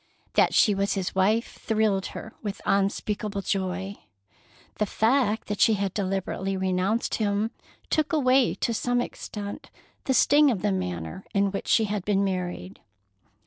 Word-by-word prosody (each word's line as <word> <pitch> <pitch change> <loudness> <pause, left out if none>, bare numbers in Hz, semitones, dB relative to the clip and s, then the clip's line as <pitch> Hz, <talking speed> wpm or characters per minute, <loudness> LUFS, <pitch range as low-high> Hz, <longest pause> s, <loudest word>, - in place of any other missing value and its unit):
That - - +3
she 210 - +5
was 200 0 0
his 190 -2 -2
wife 210 +5 +1
thrilled 215 -3 +1
her 220 - -8
with 205 -2 -4
unspeakable 200 +1 0
joy. 190 +1 -2 0.8
The 210 - +1
fact 220 0 +1
that 205 0 -3
she 220 - +5
had 195 -2 -2
deliberately 195 0 -2
renounced 190 +4 0
him 210 +1 0 0.4
took 310 0 +1
away 265 -4 +3
to 235 - -1
some 245 +2 0
extent 205 -4 -6 0.4
the 265 - +1
sting 290 +2 +5
of 215 -8 -1
the - - +2
manner 90 - -4
in 200 0 +2
which 195 - -5
she 225 - +4
had 210 -2 -2
been 200 0 +1
married. 180 - -3
200 Hz, 150 wpm, -26 LUFS, 190-220 Hz, 0.8 s, she